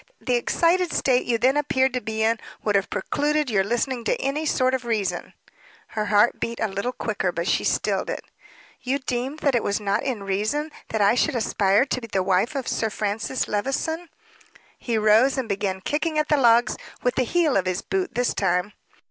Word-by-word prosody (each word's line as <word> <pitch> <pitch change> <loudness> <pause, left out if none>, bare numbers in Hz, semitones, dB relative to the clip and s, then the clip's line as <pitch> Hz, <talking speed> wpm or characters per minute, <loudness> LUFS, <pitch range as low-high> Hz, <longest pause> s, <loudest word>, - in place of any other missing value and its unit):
"The 250 - -1
excited 335 +8 +2
state 255 -2 +1
you 235 -1 +2
then 260 +4 +3
appeared 265 -3 +1
to 250 - -1
be 220 +1 -2
in, 225 0 +2 0.2
would 210 - +1
have 195 -1 +1
precluded 295 +5 0
your 195 -3 +3
listening 240 +3 -1
to - - 0
any 295 +4 -1
sort 255 -2 +2
of 260 -2 -1
reason." 205 -7 -2 0.5
Her 215 -1 -2
heart 210 +2 +3
beat 235 0 -3
a 220 - +1
little 200 +5 -3
quicker; 210 -7 -2
but 170 +1 -3
she - - +1
stilled - - 0
it. - - -4 0.6
"You 260 +2 0
deem 260 +1 -3
that 280 - +2
it 240 - +2
was 200 0 -1
not 205 +1 0
in 245 -7 -3
reason 215 +11 -1 0.2
that 220 - -2
I 200 - +5
should 250 - +1
aspire 205 0 +2
to 255 -2 -2
be 230 - -7
the 195 -3 0
wife 195 +9 +1
of 270 -3 -3
Sir 220 - 0
Francis 215 +4 -2
Levison?" 320 +10 -2 0.7
He 235 -2 -1
rose 220 +6 +4
and 260 -3 -2
began 195 -2 -2
kicking 310 - -1
at 305 0 +1
the 300 - +5
logs; 235 -3 +4 0.3
with 250 - +2
the - - +1
heel 310 +3 +1
of 185 -1 +1
his 185 0 -1
boot 380 -1 -2
this 245 0 +1
time. 180 +3 0
235 Hz, 205 wpm, -24 LUFS, 205-270 Hz, 0.7 s, I